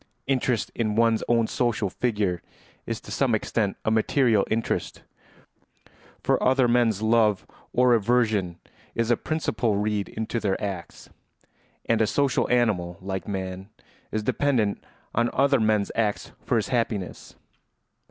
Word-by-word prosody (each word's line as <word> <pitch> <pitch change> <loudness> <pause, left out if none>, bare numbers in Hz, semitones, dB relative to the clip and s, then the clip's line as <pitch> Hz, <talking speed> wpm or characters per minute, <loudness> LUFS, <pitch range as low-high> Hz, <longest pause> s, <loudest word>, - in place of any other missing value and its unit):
Interest 130 -4 0
in 110 -3 -1
one's 115 0 +3
own 115 -1 +3
social 115 -2 0
figure 100 -5 -1 0.5
is - - -3
to - - -12
some - - +2
extent 105 -4 -1
a 110 - +2
material 110 -1 +2
interest, 115 +1 -2 1.2
for - - +2
other 130 -1 +3
men's 115 -4 +2
love 110 -3 +3 0.3
or 125 0 +4
aversion 110 -6 +1 0.4
is 115 0 +1
a - - +5
principle 115 -7 -1
read 105 0 -1
into 110 +1 -3
their 100 -3 -1
acts; 95 -5 -6 0.7
and 115 -1 +2
a 110 - +3
social 140 +2 +1
animal 100 -8 +1
like 95 0 -5
man 95 0 -5 0.4
is 110 0 -2
dependent 115 -4 0 0.3
on 120 +1 +2
other 135 0 +3
men's 110 -2 +1
acts 110 -2 -1
for - - +1
his 110 - 0
happiness. 115 -6 -2
110 Hz, 135 wpm, -25 LUFS, 100-120 Hz, 1.2 s, a